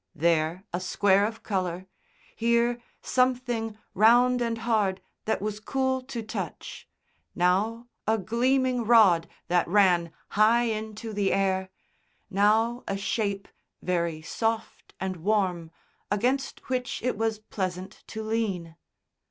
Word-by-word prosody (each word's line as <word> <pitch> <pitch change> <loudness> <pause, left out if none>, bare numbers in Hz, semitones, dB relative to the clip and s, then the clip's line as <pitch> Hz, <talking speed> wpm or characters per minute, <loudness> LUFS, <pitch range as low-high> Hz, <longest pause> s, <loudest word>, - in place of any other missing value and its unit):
There 165 +2 +1
a 175 - 0
square 200 +2 +3
of 225 0 -8
colour, 185 -3 -2 0.5
here 235 +1 +2 0.2
something 245 -4 0 0.2
round 245 +4 +5
and 230 -1 -1
hard 215 -5 +1 0.3
that 220 - -1
was 210 0 -3
cool 260 +3 0
to 255 -3 -6
touch, 220 - -6 0.5
now 210 +7 +1 0.2
a 220 +1 +3
gleaming 250 +4 +1
rod 210 -8 +5 0.2
that 175 0 +2
ran 175 -3 +3 0.2
high 220 +3 +4
into 220 -1 -4
the 200 -1 +1
air, 190 -1 +1 0.6
now 220 +5 +2
a 195 - -1
shape 200 0 -2 0.4
very 170 -3 -1
soft 225 +5 -3
and 190 -1 -3
warm 180 -3 0 0.4
against 255 +7 -1
which 250 -3 -2
it 250 - 0
was 220 0 0
pleasant 190 -2 -5
to 220 0 -6
lean. 195 -7 -2
215 Hz, 120 wpm, -27 LUFS, 190-235 Hz, 0.6 s, round